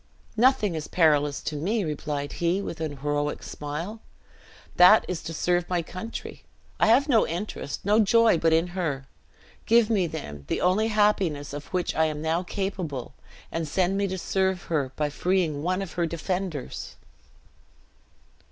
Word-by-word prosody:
"Nothing 230 -4 +3
is 155 -2 -4
perilous 150 -4 +2
to 150 - -3
me," 200 +8 0
replied 150 -2 -3
he, 175 +3 +2
with 170 -4 -5
an 150 -3 -3
heroic 145 0 -1
smile, 165 +10 -6 0.8
"that 180 +5 +8
is 175 -3 -3
to 165 - -6
serve 175 +2 0
my 175 -2 0
country. 185 +7 -7 0.4
I - - +4
have 255 +6 +5
no 235 -6 +4
interest, 175 -3 -5
no 210 +2 +4
joy 225 -3 +4
but 165 - +3
in 165 +2 +2
her. 160 -7 -3 0.6
Give 230 0 +4
me, 195 -5 +2
then, 75 - -7
the - - -1
only 190 +5 +2
happiness 195 -10 +1
of 145 0 -7
which 180 -1 -1
I 160 - +2
am 155 -1 -2
now 160 +2 +1
capable, 180 - -4 0.4
and 165 -1 -2
send 185 +4 +1
me 200 0 +1
to 190 0 -3
serve 190 0 0
her, 140 -4 0
by 150 -1 -1
freeing 175 -3 0
one 185 +4 0
of 185 - -8
her 170 -1 0
defenders!" 170 -2 -4
175 Hz, 160 wpm, -26 LUFS, 150-195 Hz, 0.8 s, that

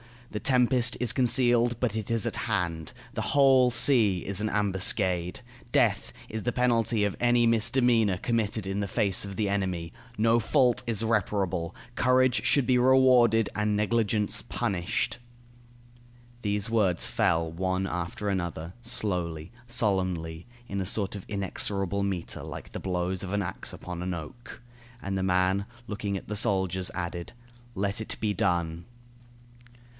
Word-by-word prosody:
The 105 - -3
tempest 125 -1 +3
is 120 -2 +3
concealed, 120 -1 +2
but 120 -4 -1
it 110 -2 -3
is 115 -3 +1
at - - -1
hand. 85 +1 -2 0.2
The 110 - -3
whole 130 +2 +4
sea 115 -7 +4
is 100 0 -2
an 110 - 0
ambuscade. 95 -2 0 0.3
Death - - +2 0.2
is 110 0 -4
the 120 - -1
penalty 115 -3 +1
of 100 -1 -1
any 120 0 +3
misdemeanor 115 -3 +3
committed 110 -1 -1
in 95 +1 -3
the 100 - -1
face 100 0 +1
of 100 -1 -7
the 105 -1 -1
enemy. 90 -4 -2 0.3
No 115 +2 +3
fault 125 +1 +2
is 115 -1 0
reparable. 95 -6 -1 0.2
Courage 130 0 +2
should 140 -3 +3
be 125 +1 +3
rewarded, 125 -4 +4
and 105 0 0
negligence 105 -1 0
punished." 95 +4 -2 1.2
These 105 -1 -1
words 100 -7 +2
fell 80 0 +1
one 95 +2 -1
after 90 +2 -3
another, 85 -3 -3
slowly, 90 -8 -1 0.2
solemnly, 95 -7 -1 0.2
in 100 -4 -3
a - - -3
sort 100 0 +1
of 100 -3 -7
inexorable 100 0 -1
metre, 95 -4 -3
like - - -8
the - - -6
blows 90 0 -2
of 95 0 -5
an 100 -1 0
axe - - -5
upon 90 -1 -7
an 90 +1 -3
oak. 85 +11 -9 0.4
And 100 0 -3
the 95 - -1
man, 95 +1 +1 0.2
looking 105 -2 -3
at - - -10
the 105 - -2
soldiers, 95 -2 0
added: 85 -1 -5 0.4
"Let 100 +1 -1
it 110 - -4
be 105 -2 0
done." 85 -2 -1
100 Hz, 150 wpm, -27 LUFS, 95-115 Hz, 1.2 s, whole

